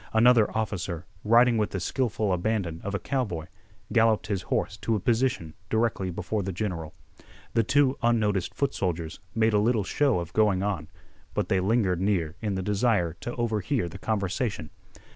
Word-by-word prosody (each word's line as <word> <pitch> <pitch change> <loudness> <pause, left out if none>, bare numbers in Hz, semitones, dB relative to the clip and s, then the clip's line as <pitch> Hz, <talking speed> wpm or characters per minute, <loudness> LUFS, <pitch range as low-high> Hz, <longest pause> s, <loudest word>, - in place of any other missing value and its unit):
Another 115 -1 +5
officer, 90 -6 -3 0.2
riding 115 +1 +5
with 105 - +1
the 95 - -3
skillful 110 0 0
abandon 90 -3 -1
of 100 0 -3
a - - -1
cowboy, 105 - -2 0.5
galloped 115 -2 +3
his 100 -3 -2
horse - - -1
to 115 - 0
a - - 0
position 115 -8 0 0.2
directly 110 -4 0
before 105 +4 -2
the 95 0 -3
general. 85 -5 -4 0.6
The 115 - +4
two 135 +4 +2
unnoticed 105 -5 +1
foot 140 -1 0
soldiers 85 -3 -3 0.2
made 110 -1 +3
a 105 - +4
little 110 0 +2
show 135 +2 +1
of 85 -1 -6
going 105 -3 +3
on, 95 -7 -2 0.5
but - - -1
they 95 - +3
lingered 95 -3 +1
near 90 -5 0
in 105 -3 -1
the 95 - -2
desire 105 -4 +1
to 120 - -4
overhear 115 -1 0
the 90 +3 -9
conversation. 100 - -2
105 Hz, 170 wpm, -27 LUFS, 90-115 Hz, 0.6 s, Another